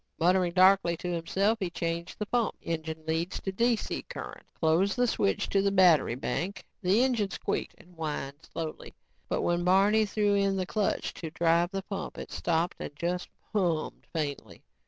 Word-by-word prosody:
Muttering 180 +1 +3
darkly 185 -2 +5
to 175 +1 -3
himself, 195 +6 +1
he 190 -4 -1
changed 170 +1 -3
the 210 - -2
pump 235 +1 0
engine 160 -1 -4
leads 165 +3 -1
to 195 - -3
DC 230 +3 0
current - - -7
and - - -38
closed 170 +5 +2
the 245 - +3
switch 100 - +1
to 195 - +3
the 200 - +2
battery 175 -10 +5
bank. 170 +9 -3 0.2
The 200 +6 +4
engine 235 -6 +1
squeaked - - -3
and 180 - -18
whined 150 -3 -4
slowly 160 -2 -6 0.3
but - - 0
when 175 0 +1
Barney 200 +4 +4
threw 205 0 +1
in 200 -1 +2
the 185 -1 -1
clutch 210 +1 -1
to 165 - -6
drive 170 +1 +2
the 195 0 -4
pump, 195 -1 -5
it - - -7
stopped 170 0 0
and 145 - -6
just 175 +3 -2 0.2
hummed 175 -7 -1
faintly. 140 - -4
180 Hz, 180 wpm, -29 LUFS, 165-200 Hz, 0.3 s, darkly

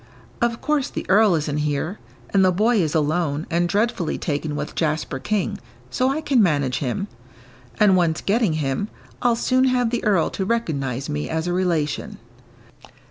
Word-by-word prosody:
"Of 235 -1 0
course 295 -2 0
the - - -5
earl 205 -1 +5
isn't 150 -1 -1
here 150 +6 -2 0.3
and 195 -1 +4
the 185 - +5
boy 215 +4 +2
is 155 -2 -1
alone, 155 -1 0
and 170 +1 +1
dreadfully 205 -5 0
taken 150 0 -2
with - - -4
Jasper 155 -4 -1
King, 210 +6 -1 0.3
so 255 0 +1
I 285 +4 -1
can 275 -6 +3
manage 145 - +1
him. 145 +9 -2 0.7
And 205 -3 +5
once 170 -3 +2
getting 210 -3 +1
him, 150 +5 -1 0.3
I'll 240 -1 +3
soon 255 +2 +2
have 250 -3 +2
the 240 - -1
earl 200 -6 +2
to 195 - -3
recognise 140 - -2
me 75 0 -3
as 160 0 -1
a 175 - -1
relation." 170 -5 -1
175 Hz, 170 wpm, -22 LUFS, 150-225 Hz, 0.7 s, earl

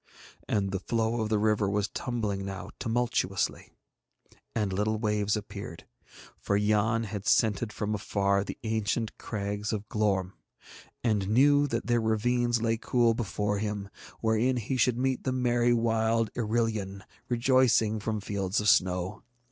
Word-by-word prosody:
And 100 -2 0
the 95 - -1
flow 115 +3 -1
of 110 - -1
the 110 - +2
river 105 -1 +2
was 100 0 0
tumbling 110 -6 -3
now 95 0 -6
tumultuously, 115 -5 -1 0.9
and 105 -4 0
little 105 +3 0
waves 105 -1 0
appeared; 100 -4 -8 0.5
for 100 - 0
Yann 105 +2 +2
had 105 -1 -5
scented 110 0 +2
from 105 0 -3
afar 100 -1 +1
the - - -7
ancient 110 0 -1
crags 105 -1 -3
of 105 -1 -4
Glorm, 95 -3 0 0.7
and 105 -5 +1
knew 145 +5 +5
that 115 -3 -2
their 120 0 +2
ravines 120 +1 +1
lay 115 0 +1
cool 120 0 +2
before 105 -2 -2
him 105 -1 -3 0.3
wherein 115 +3 +2
he 120 +3 -2
should 125 -1 +2
meet 130 0 0
the 130 - 0
merry 120 -1 +2
wild 115 -1 +1
Irillion 110 -4 -1 0.3
rejoicing 120 -3 +3
from 110 0 -2
fields 100 0 -1
of 105 0 +2
snow. 90 +3 +2
110 Hz, 145 wpm, -28 LUFS, 100-115 Hz, 0.9 s, knew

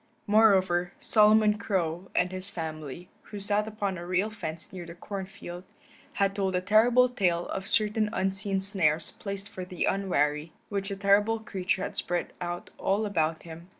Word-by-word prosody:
Moreover, 190 -4 +4
Solomon 215 0 +4
Crow 185 -4 -1
and 180 0 +2
his 185 +1 -6
family, 160 -2 -6 0.2
who 205 - -7
sat 205 +1 0
upon 205 -4 -3
a 175 - -7
rail 185 +4 +1
fence 165 -6 -7
near 180 -2 -6
the 170 0 -10
corn 195 +1 -6
field, 180 -3 -9 0.5
had 195 0 +1
told 190 -2 0
a - - +3
terrible 235 +6 +5
tale 180 -8 0
of 195 0 -4
certain 215 0 +2
unseen 195 -1 -1
snares 165 -6 +2
placed 200 0 -6
for 195 -3 -7
the 180 -1 -2
unwary, 155 -5 0 0.2
which 200 -1 -2
the 200 - -3
terrible 205 +3 +3
creature 190 -3 -2
had - - -5
spread 175 -1 -2
out 175 0 -5
all 200 +3 +1
about 160 -5 0
him. 165 +1 -11
195 Hz, 170 wpm, -28 LUFS, 175-205 Hz, 0.5 s, terrible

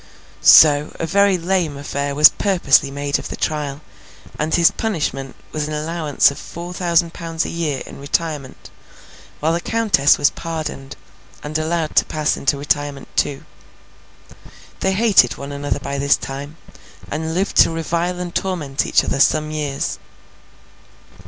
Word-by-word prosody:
So, 145 - +6
a - - -1
very 200 +2 +3
lame 170 -4 -1
affair 140 0 -3
was 150 +1 +9
purposely 170 -8 +2
made 140 0 -2
of - - -7
the - - -5
trial, 150 -2 -3 0.6
and 155 +1 -1
his 170 0 +4
punishment 145 - -3 0.2
was 150 -1 -3
an 155 - -4
allowance 155 -2 +1
of 140 - -9
four 175 +1 -8
thousand 170 -2 +1
pounds 165 -1 -3
a - - -4
year 155 -6 -2
in - - -11
retirement, 145 -1 -4 0.7
while 160 +2 +1
the 170 - -1
Countess 215 -12 +2
was 145 0 +3
pardoned, 155 -5 -6 0.5
and 150 +1 -7
allowed 160 0 -2
to - - +5
pass 155 -1 -1
into 140 +1 0
retirement 145 -1 -2
too. 140 -2 -1 1.3
They 190 - 0
hated 215 +1 +4
one 140 +1 -7
another 145 0 -3
by 140 0 -4
this 140 +1 +3
time, 140 +3 -7 0.5
and 160 +2 -3
lived 195 +3 -1
to - - +7
revile 170 +2 -2
and 180 -1 -5
torment 155 -8 -2
each - - +3
other - - -2
some 155 +2 +2
years. 145 -3 -3
155 Hz, 150 wpm, -19 LUFS, 140-170 Hz, 1.3 s, was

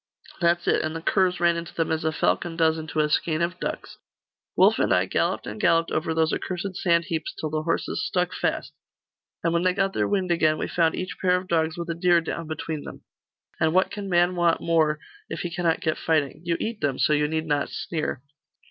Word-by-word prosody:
'That's 175 -1 +2
it - - +3
and 155 +1 -3
the 165 - -4
curs 180 -1 +2
ran 170 0 +3
into 170 0 -6
them 165 - 0
as 160 -1 -1
a 160 - +1
falcon 165 +2 0
does 160 -1 +3
into 155 0 -4
a 150 - +2
skein 155 +1 0
of 175 +1 -1
ducks. - - -5 0.6
Wulf - - +5
and - - +2
I - - +4
galloped - - -1
and 105 0 -6
galloped 165 0 +3
over 160 - -1
those 160 0 +2
accursed 185 +1 -3
sand 170 -3 +2
heaps 160 -3 -3
till 155 - -3
the 155 0 -1
horses 165 +2 -1
stuck 180 0 0
fast; - - -2 0.7
and 170 - +1
when 170 - +2
they 185 0 +2
got 195 -1 +1
their - - +1
wind 190 -3 0
again, 155 -2 +3
we - - -2
found 165 -2 +1
each 185 - -5
pair 180 -1 +3
of 180 0 -3
dogs 160 -1 0
with 170 0 -4
a 170 - -1
deer 175 0 +3
down 165 0 -5
between 155 -1 -4
them - - -10 0.6
and 160 +1 +2
what 185 - +3
can 200 -1 -5
man 175 0 +3
want 175 -1 +2
more, 160 -2 +2 0.3
if 165 - -4
he 175 -1 -4
cannot 170 -2 0
get 155 -2 -1
fighting? 155 -2 0
You 170 -1 0
eat 225 -1 -4
them, 140 -3 0
so 150 - +3
you 150 0 +2
need 160 +1 -2
not 145 -2 0
sneer. 155 -5 -4
165 Hz, 230 wpm, -25 LUFS, 160-175 Hz, 0.7 s, Wulf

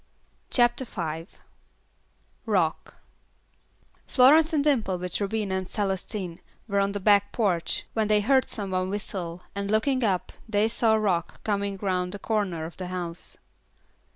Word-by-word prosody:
CHAPTER 240 +1 +3
V 165 -7 -5 1.2
Rock 180 -7 0 1.1
Florence 300 +6 +6
and 300 -3 +2
Dimple 230 -11 +2
with 180 +2 -2
Rubina 200 -1 -1
and 190 -1 -2
Celestine 190 -3 -3 0.3
were 200 -2 +1
on 200 0 +1
the 205 - -2
back 205 0 +4
porch, 185 -7 0
when 220 -2 +1
they 210 0 +3
heard 260 +4 +3
some 200 -3 -4
one 185 0 0
whistle, 180 -4 -4
and 200 0 -3
looking 255 +5 +2
up 190 -5 0 0.2
they 210 0 +3
saw 225 -1 +2
Rock 190 -6 -1
coming 200 -2 -1
around 180 -1 0
the - - -4
corner 195 -6 -1
of 165 - -9
the 185 - -5
house. 180 -2 -2
200 Hz, 145 wpm, -26 LUFS, 185-220 Hz, 1.2 s, Florence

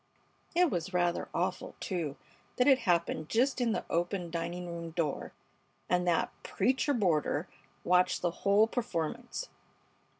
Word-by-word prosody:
It 355 -2 +4
was 180 +2 -2
rather 175 -1 +1
awful, - - -2
too, 165 -7 -3 0.4
that 250 - +3
it 270 -2 +6
happened 170 -2 +1
just 255 +3 +2
in 235 -2 +2
the 220 - -2
open 175 0 -1
dining 170 +1 -3
room 170 -1 -5
door, 160 -3 -2 0.6
and 180 0 +1
that 170 -2 +2
"preacher 265 +2 +1
boarder" 170 -5 +1 0.4
watched 180 0 +3
the 175 - +2
whole 200 +5 +4
performance. 235 - -3
180 Hz, 135 wpm, -31 LUFS, 170-230 Hz, 0.6 s, it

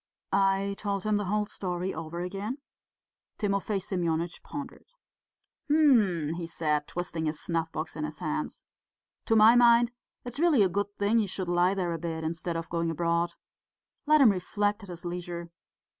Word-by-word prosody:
I 195 0 +2
told 200 -2 -2
him 215 -1 +1
the 205 - -2
whole 210 +2 0
story 180 -2 -3
over 165 +2 -5
again. 200 +7 -4 0.8
Timofey 200 0 0
Semyonitch 170 -3 -2
pondered. 285 -1 -8 0.8
"Hm!" 215 - +4
he 170 -2 -4
said, 150 -3 -1
twisting 170 -2 -3
his 155 0 -3
snuff 165 -1 -2
box 160 +1 -5
in 155 - -4
his 155 0 -5
hands. 155 -3 -4 0.6
"To 225 - +3
my 220 +2 +7
mind 240 0 +6 0.3
it's 245 +3 -5
really 315 -10 +5
a 190 - +3
good 200 +3 -1
thing 205 +3 +3
he 210 - +1
should 185 -1 -3
lie 175 +2 +3
there 180 -3 -1
a 165 - -4
bit, 160 -1 -4
instead 165 +1 -3
of 165 0 -5
going 170 0 -1
abroad. 170 +1 0 0.7
Let 305 0 +6
him 240 -6 +8
reflect 205 +3 -1
at 200 - -11
his 175 0 -8
leisure. 175 -1 -5
180 Hz, 170 wpm, -28 LUFS, 170-205 Hz, 0.8 s, him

